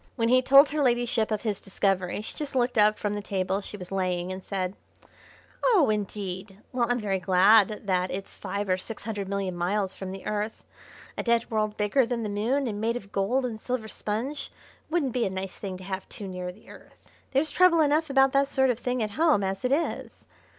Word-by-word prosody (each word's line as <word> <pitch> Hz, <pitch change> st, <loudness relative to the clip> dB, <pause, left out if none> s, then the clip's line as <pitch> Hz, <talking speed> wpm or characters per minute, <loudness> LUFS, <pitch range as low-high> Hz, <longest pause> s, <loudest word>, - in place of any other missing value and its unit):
When 230 Hz, -2 st, +1 dB
he 255 Hz, +1 st, +5 dB
told 275 Hz, +3 st, +7 dB
her 300 Hz, +1 st, -1 dB
ladyship 240 Hz, -3 st, +2 dB
of 215 Hz, 0 st, -2 dB
his 210 Hz, -4 st, -1 dB
discovery 195 Hz, -1 st, 0 dB
she 215 Hz, -, -7 dB
just 295 Hz, -3 st, -5 dB
looked 245 Hz, -1 st, +1 dB
up 210 Hz, 0 st, +5 dB
from 205 Hz, -1 st, -2 dB
the 205 Hz, -, -3 dB
table 190 Hz, -1 st, -1 dB
she 205 Hz, -, -8 dB
was 180 Hz, -1 st, -10 dB
laying 185 Hz, -1 st, -1 dB
and 185 Hz, 0 st, -6 dB
said: 190 Hz, -1 st, -3 dB, 0.9 s
"Oh, 375 Hz, -, +4 dB
indeed! 195 Hz, -2 st, -4 dB
Well, 245 Hz, -2 st, +1 dB
I'm 245 Hz, 0 st, +2 dB
very 195 Hz, -3 st, -1 dB
glad 195 Hz, +4 st, +4 dB
that 185 Hz, -2 st, +1 dB
it's 195 Hz, +1 st, -6 dB
five 200 Hz, +1 st, -4 dB
or 185 Hz, -1 st, +2 dB
six 215 Hz, +4 st, -7 dB
hundred 205 Hz, -3 st, -4 dB
million 195 Hz, -2 st, -2 dB
miles 190 Hz, +3 st, -1 dB
from 190 Hz, -1 st, -7 dB
the 190 Hz, 0 st, -8 dB
Earth. 210 Hz, +1 st, -3 dB, 0.6 s
A -, -, +2 dB
dead 235 Hz, -1 st, +1 dB
world 215 Hz, -1 st, 0 dB
bigger 210 Hz, +6 st, +3 dB
than 235 Hz, -1 st, -2 dB
the 210 Hz, -, -2 dB
Moon, 235 Hz, +8 st, 0 dB
and 210 Hz, -3 st, -3 dB
made 230 Hz, +2 st, 0 dB
of 200 Hz, -4 st, -11 dB
gold 245 Hz, +7 st, +1 dB
and 220 Hz, -3 st, -5 dB
silver 250 Hz, -3 st, -3 dB
sponge, 230 Hz, +8 st, -4 dB, 0.4 s
wouldn't 310 Hz, -7 st, 0 dB
be 245 Hz, -4 st, +1 dB
a -, -, -2 dB
nice 190 Hz, 0 st, -5 dB
thing 190 Hz, -2 st, -5 dB
to 185 Hz, -, -11 dB
have 190 Hz, 0 st, -5 dB
too 205 Hz, -, -7 dB
near 180 Hz, -1 st, -5 dB
the 200 Hz, +4 st, -20 dB
Earth. -, -, -15 dB, 0.3 s
There's 280 Hz, +4 st, +1 dB
trouble 365 Hz, -2 st, +5 dB
enough 305 Hz, +1 st, +2 dB
about 270 Hz, -1 st, +4 dB
that 275 Hz, +1 st, +2 dB
sort 265 Hz, -1 st, +3 dB
of 235 Hz, -, -4 dB
thing 250 Hz, -1 st, -1 dB
at 210 Hz, -, -3 dB
home 300 Hz, -3 st, +3 dB
as 195 Hz, 0 st, -2 dB
it 250 Hz, -, 0 dB
is. 315 Hz, +5 st, -2 dB
210 Hz, 220 wpm, -27 LUFS, 195-250 Hz, 0.9 s, told